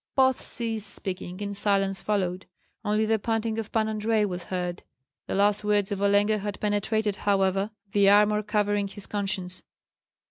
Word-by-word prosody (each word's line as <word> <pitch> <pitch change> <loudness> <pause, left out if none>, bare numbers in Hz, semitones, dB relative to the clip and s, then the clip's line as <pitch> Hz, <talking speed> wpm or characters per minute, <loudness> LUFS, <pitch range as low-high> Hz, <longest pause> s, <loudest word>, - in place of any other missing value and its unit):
Both 260 -1 +3
ceased 225 -3 -2
speaking, 185 0 -5
and 200 0 -4
silence 195 -1 +1
followed; 185 -3 -1 0.4
only 215 +1 +1
the 220 0 +2
panting 225 +1 -1
of 220 - -5
Pan 220 -1 +1
Andrei 215 0 +1
was 180 -3 -4
heard. 180 -1 -3 0.5
The - - -2
last 205 +1 +3
words 205 -1 +1
of 200 -1 -2
Olenka 205 +1 +3
had 205 0 -5
penetrated, 210 0 0
however, 195 0 +1 0.2
the 200 -1 +5
armor 210 +1 +5
covering 205 -1 0
his 200 0 -6
conscience. 190 -3 -3
205 Hz, 155 wpm, -26 LUFS, 195-215 Hz, 0.5 s, the